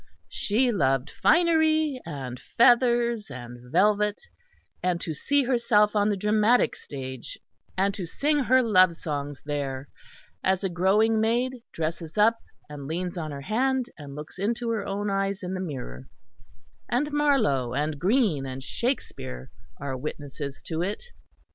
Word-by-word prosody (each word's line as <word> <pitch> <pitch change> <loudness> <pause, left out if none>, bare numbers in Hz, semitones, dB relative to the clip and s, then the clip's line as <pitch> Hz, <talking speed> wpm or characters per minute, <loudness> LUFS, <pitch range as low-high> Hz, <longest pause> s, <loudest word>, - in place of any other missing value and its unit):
She 240 +4 +1
loved 135 - +1
finery 315 -4 +3
and 130 -5 -6 0.2
feathers 235 - +4
and 120 -2 -9
velvet, 210 +3 +3 0.6
and 180 -1 0
to 165 -2 -3
see 285 - +1
herself 235 -4 +3
on 205 0 +3
the 205 - 0
dramatic 215 +4 +3
stage 130 -3 -7 0.4
and 195 +1 +2
to 185 -4 -5
sing 295 - +1
her 260 +2 +5
love 185 -6 +5
songs 145 -3 -5
there, 140 -2 -3 0.5
as 190 0 +1
a 195 - 0
growing 210 +5 +3
maid 245 +3 0
dresses 165 +1 -4
up 225 +2 +4 0.3
and 145 -2 -8
leans 175 +3 -3
on 160 -3 -4
her 140 -1 -6
hand 255 - 0
and 140 -3 -10
looks 150 +4 -9
into 230 +3 -1
her 220 -3 -1
own 200 +1 -2
eyes 195 0 -1
in 180 +1 -3
the 185 - -3
mirror 95 - -6 0.8
and 290 +5 0
Marlowe 225 - +2
and 150 0 -1
Greene 185 - +2
and 130 0 -6
Shakespeare 130 - -4 0.3
are 140 -1 -3
witnesses 140 0 -6
to 160 -1 -3
it. 200 +4 -3
190 Hz, 145 wpm, -26 LUFS, 145-235 Hz, 0.8 s, her